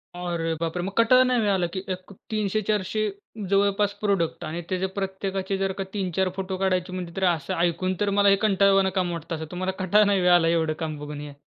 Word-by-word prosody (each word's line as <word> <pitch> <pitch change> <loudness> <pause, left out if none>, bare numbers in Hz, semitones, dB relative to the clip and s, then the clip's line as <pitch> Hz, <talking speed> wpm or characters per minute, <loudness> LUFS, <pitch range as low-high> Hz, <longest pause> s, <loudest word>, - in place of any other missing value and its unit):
अरे 170 -2 -2
बापरे! 165 +1 -2
मग 195 - -3
कंटाळा 255 +3 +6
नाही 250 -1 +2
होय 210 -2 +1
आलं 185 -3 +1
की 190 - -3
एक 185 +2 -11 0.2
300-400 215 0 0 0.5
जवळपास 200 +1 +2
प्रॉडक्ट 195 -5 0
आणि 160 +3 -4
त्याचे 185 0 0
प्रत्येकाचे 195 0 -2
जर 195 0 0
का 195 - -1
3-4 190 -2 0
फोटो 190 0 -3
काढायचे 185 -1 0
म्हणजे 180 -2 -5
तरी 190 - +1
असं 170 -5 0
ऐकून 175 +2 +1
तर 205 - +2
मला 200 0 +5
हे 195 - +6
कंटाळवाणं 195 -2 +4
काम 180 -2 0
वाटतं 165 0 -5
असं. 160 0 -5
तुम्हाला 185 +1 -2
कंटाळा 210 +3 +4
नाही 200 -1 +2
होय 180 0 +3
आला 175 -2 +5
एवढं 165 -2 +1
काम 155 -1 -3
बघून 150 0 -7
हे? 145 -1 -8
190 Hz, 210 wpm, -25 LUFS, 175-200 Hz, 0.5 s, कंटाळा